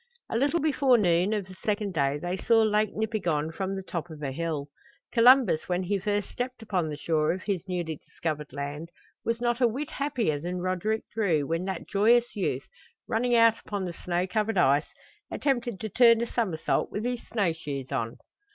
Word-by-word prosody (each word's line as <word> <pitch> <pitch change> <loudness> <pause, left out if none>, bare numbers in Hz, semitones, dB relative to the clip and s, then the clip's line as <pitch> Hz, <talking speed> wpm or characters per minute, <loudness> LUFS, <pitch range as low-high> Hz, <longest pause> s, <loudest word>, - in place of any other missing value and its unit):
A - - -1
little 285 +8 +2
before 275 -5 +3
noon 180 -1 +2
of 210 -3 -1
the 190 - -12
second 205 +1 -2
day 140 -2 +1
they 175 +4 -3
saw 225 +4 +3
Lake 210 -1 +1
Nipigon 180 -9 -1
from 190 +3 -3
the 190 - -5
top 175 -2 -5
of 155 -2 -9
a 135 - -2
hill. 155 -1 -3 0.4
Columbus 240 -9 +5
when 180 +1 0
he 195 +2 0
first 205 +1 -1
stepped 250 -1 -5
upon 180 -7 -1
the 150 - -5
shore 155 0 +1
of 185 - -4
his 195 -2 -2
newly 175 -4 -3
discovered 150 -1 -5
land 145 +3 -5 0.3
was 230 0 -1
not 240 +1 0
a 245 - +6
whit 275 +7 -4
happier 245 - -1
than 175 +4 -4
Roderick 185 +5 -1
Drew 180 -10 +1
when 165 +4 -1
that 190 -3 -4
joyous 235 +4 +3
youth, 200 - -1 0.4
running 240 +2 +1
out 230 -1 +5
upon 200 -2 -3
the 175 - -4
snow 175 +1 -1
covered 210 +3 -1
ice, 145 -3 +4 0.4
attempted 240 -7 -1
to 220 - -3
turn 230 +1 +6
a - - +1
somersault 210 -10 -1
with 210 +3 -3
his 245 -1 -2
snow 200 -7 +1
shoes 140 -5 -6
on! 120 -3 -2
195 Hz, 195 wpm, -27 LUFS, 165-230 Hz, 0.4 s, a